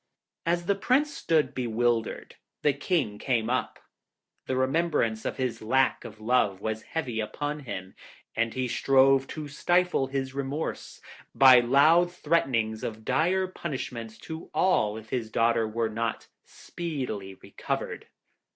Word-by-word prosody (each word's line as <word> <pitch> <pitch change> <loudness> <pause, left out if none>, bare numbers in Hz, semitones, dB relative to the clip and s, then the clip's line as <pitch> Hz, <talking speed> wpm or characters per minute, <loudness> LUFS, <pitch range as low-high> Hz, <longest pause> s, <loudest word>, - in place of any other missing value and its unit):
As 175 0 +1
the 200 - +3
Prince 260 +9 +1
stood 150 -4 +1
bewildered, 120 -2 -1 0.3
the 145 - +4
King 140 - -1
came 120 -3 0
up. 130 - -1 0.7
The 130 - -1
remembrance 130 -5 0
of - - -3
his 130 -3 -2
lack 130 +4 +2
of - - -10
love 110 -4 +1
was 110 +1 -3 0.2
heavy 125 -8 -2
upon 145 +7 -3
him, 95 -9 -7 0.4
and 115 0 0
he 130 -1 -1
strove 135 +2 +4
to 155 -1 -6
stifle 175 0 +1
his 135 -1 -3
remorse 140 +3 -4 0.3
by 130 -2 +8
loud 155 +8 +4
threatenings 130 -10 0
of 110 -1 -5
dire 185 +4 +2
punishment 125 -10 -6
to 160 0 -8
all 110 - +2
if 110 0 -11
his 120 -4 -2
daughter 115 0 +2
were 115 +1 -1
not 115 +1 -3 0.2
speedily 130 - -5
recovered. - - -5
130 Hz, 135 wpm, -27 LUFS, 115-155 Hz, 0.7 s, by